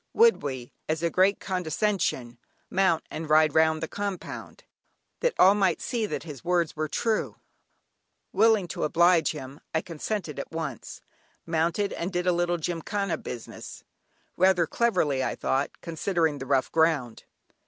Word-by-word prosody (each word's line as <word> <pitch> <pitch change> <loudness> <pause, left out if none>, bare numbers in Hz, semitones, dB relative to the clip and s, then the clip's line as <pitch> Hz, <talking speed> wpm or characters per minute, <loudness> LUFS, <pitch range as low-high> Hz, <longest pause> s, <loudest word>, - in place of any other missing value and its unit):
Would 460 0 +5
we, 130 -4 -5 0.2
as 160 +1 -1
a 170 - +1
great 190 +2 +3
condescension, 180 - -1 0.3
mount 185 -4 +2
and 160 -1 -5
ride 155 -1 +5
round 160 0 +3
the - - -1
compound, 200 0 -6 0.6
that - - 0
all 190 +2 +7
might 195 -4 +1
see 230 -4 -2
that - - -4
his 150 -6 -9
words 175 -2 +1
were 155 0 -2
true. 220 +8 -1 1.0
Willing 215 -2 +4
to - - -4
oblige 170 +1 +4
him, 140 -1 -7 0.2
I 160 - +2
consented 170 -1 -4
at - - -6
once, 160 -7 -6 0.4
mounted, 170 +5 0
and 170 +3 -3
did 180 -1 -1
a 180 - +4
little 175 0 +1
"gymkhana 175 +3 -2
business," 120 -2 -8 0.5
rather 185 -1 +4
cleverly, 160 - +1
I - - -1
thought, 135 +2 0
considering 165 -2 -1
the 135 - -6
rough 135 -1 +1
ground. 160 -8 +1
165 Hz, 150 wpm, -27 LUFS, 155-190 Hz, 1.0 s, all